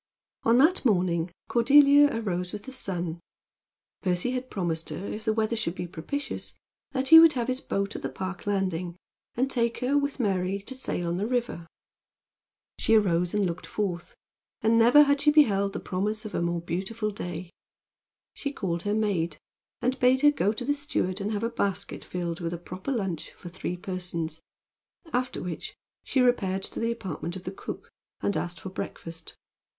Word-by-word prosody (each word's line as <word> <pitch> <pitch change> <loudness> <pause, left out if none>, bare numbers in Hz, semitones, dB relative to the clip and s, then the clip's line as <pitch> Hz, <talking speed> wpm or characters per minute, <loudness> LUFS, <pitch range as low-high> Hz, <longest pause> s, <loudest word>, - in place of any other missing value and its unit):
On 230 +1 +4
that 320 +8 +4
morning 180 -7 +2 0.2
Cordelia 285 +4 +6
arose 180 -7 -2
with 205 - -6
the 265 - -8
sun. 175 -9 -3 0.8
Percy 180 +5 +1
had 255 0 -3
promised 165 -4 -2
her, 190 - -5
if 215 +2 -5
the 220 - +3
weather 220 +1 0
should 200 -6 -2
be 180 - -4
propitious, 180 - -5 0.3
that 265 -1 -2
he 325 0 +12
would 325 -1 +8
have 245 -3 -1
his 255 +1 -1
boat 200 +1 -2
at - - -5
the - - -3
Park 190 +1 -6
landing, 185 -4 -1 0.4
and 255 +3 +2
take 235 -2 +1
her, 260 +3 0
with 285 -1 0
Mary, 195 -3 0
to 255 - -6
sail 215 -9 -2
on 170 +1 -1
the 205 +3 -1
river. 240 -9 -2 1.1
She 225 - +3
arose 180 -3 +2
and 205 -1 +2
looked 175 0 -4
forth; 180 -5 -3 0.5
and 225 +1 +4
never 245 +6 +8
had 285 0 +2
she 300 - +5
beheld 205 -10 +4
the - - -3
promise 210 +4 -2
of 215 - -6
a - - 0
more 170 0 0
beautiful 195 +6 -3
day. 175 -3 -6 0.8
She 280 - -4
called 175 -10 -2
her 205 +2 0
maid, 175 -7 0 0.5
and 255 +1 +1
bade 255 +1 +4
her 295 0 +7
go 210 -8 +1
to 235 +3 -5
the 290 - +2
steward 215 -9 -2
and 205 +2 -2
have 210 0 -2
a - - +2
basket 200 -4 -2
filled 175 -2 -4
with 170 -1 -3
a - - -3
proper 185 +8 -6
lunch 195 - -3
for 175 - -10
three 180 0 -4
persons, 175 -4 -4 0.7
after 250 +1 -1
which 175 -3 -5 0.3
she 265 - +1
repaired 195 -6 +2
to - - -4
the 230 0 +1
apartment 180 -6 -5
of 185 - -7
the 185 - -4
cook 195 - -8 0.3
and 200 - 0
asked 175 0 -3
for 190 - -6
breakfast. 165 -3 -7
200 Hz, 185 wpm, -27 LUFS, 180-245 Hz, 1.1 s, he